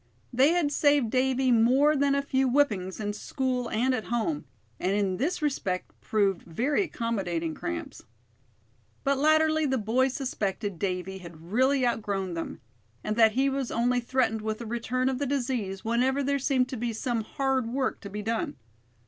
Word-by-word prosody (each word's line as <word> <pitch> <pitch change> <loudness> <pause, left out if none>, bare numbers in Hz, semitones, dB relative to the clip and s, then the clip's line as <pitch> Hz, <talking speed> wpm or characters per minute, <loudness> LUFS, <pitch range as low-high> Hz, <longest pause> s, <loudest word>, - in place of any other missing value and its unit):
They 270 +6 +5
had 335 -5 +1
saved 285 -6 +3
Davy 260 0 +2
more 255 +6 +4
than 280 0 +2
a 280 - 0
few 265 -2 +1
whippings, 215 -10 +1
in 205 -1 -2
school 250 +1 -2
and 250 +4 +1
at 235 -4 -2
home: 220 -11 -1 0.3
and 190 - 0
in 195 -2 0
this 305 - -1
respect 195 -11 -1
proved 200 -4 +1
very 250 - 0
accommodating 190 - -2
cramps. 335 - -5 1.0
But 275 -1 +1
latterly 315 +1 +3
the 265 -1 +1
boys 255 +4 +1
suspected 205 - -3
Davy 190 0 -3
had 170 -1 -12
really 260 +3 +3
outgrown 200 -6 -1
them; 165 -1 -5 0.4
and 215 - -1
that 220 -1 +5
he 265 +3 +2
was 270 -2 -1
only 245 +2 +1
threatened 240 -2 0
with 215 0 -3
a 235 - -6
return 240 +3 -1
of 265 -1 0
the 285 - -1
disease 240 -7 -2
whenever 255 +4 +1
there 280 +1 +1
seemed 260 -2 +2
to 255 - -4
be 235 0 -2
some 230 +1 -1
hard 265 0 -1
work 260 +2 -1
to 200 - -7
be 210 +1 -5
done. 225 +1 -2
245 Hz, 175 wpm, -27 LUFS, 210-270 Hz, 1.0 s, They